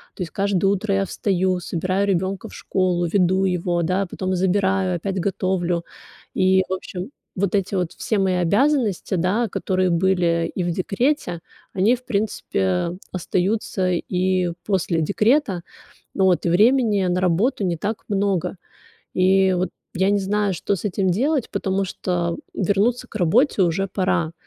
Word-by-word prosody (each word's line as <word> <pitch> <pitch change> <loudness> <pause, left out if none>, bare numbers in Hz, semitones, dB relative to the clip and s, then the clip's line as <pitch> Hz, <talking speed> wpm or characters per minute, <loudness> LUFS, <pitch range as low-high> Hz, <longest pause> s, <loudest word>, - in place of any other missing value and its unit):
То - - -9
есть 165 - -8
каждое 195 -1 +1
утро 200 +1 +1
я 195 0 +1
встаю, 185 -2 0
собираю 185 +3 -1
ребёнка 190 0 -1
в - - -12
школу, 180 -2 0
веду 185 +1 +2
его, 175 -1 0
да, 185 +4 0
потом 185 +1 -3
забираю, 190 0 +1
опять 190 +2 -3
готовлю. 180 -2 -1 0.5
И, 190 0 +3
в - - -1
общем, 185 +3 -6 0.3
вот 200 +1 0
эти 195 0 0
вот 180 -3 -1
все 215 - -2
мои 190 -2 +2
обязанности, 205 - +1
да, 190 +6 +1
которые 185 -1 0
были 170 -1 +1
и 185 - -1
в 175 - -1
декрете, 195 - -1 0.3
они, 210 +7 +3
в 250 - -22
принципе, 170 - -1 0.2
остаются 185 +1 -1
и 180 0 0
после 180 -4 0
декрета. 210 - +2 0.5
Вот, 190 -3 +2
и - - +2
времени 215 +2 +3
на 180 0 +1
работу 190 +6 +1
не 175 -2 0
так 210 +7 -4
много. 200 -4 0 0.6
И 190 0 +4
вот 180 0 -1 0.2
я 190 +2 +2
не 205 - +3
знаю, 200 0 0
что 195 +3 -1
с 195 - -9
этим 195 -1 0
делать, 265 - +1
потому 195 -1 -1
что 175 -2 -2 0.2
вернуться 200 +6 0
к - - -9
работе 210 - +3
уже 180 +2 +1
пора. 185 -4 0
190 Hz, 155 wpm, -22 LUFS, 180-200 Hz, 0.6 s, И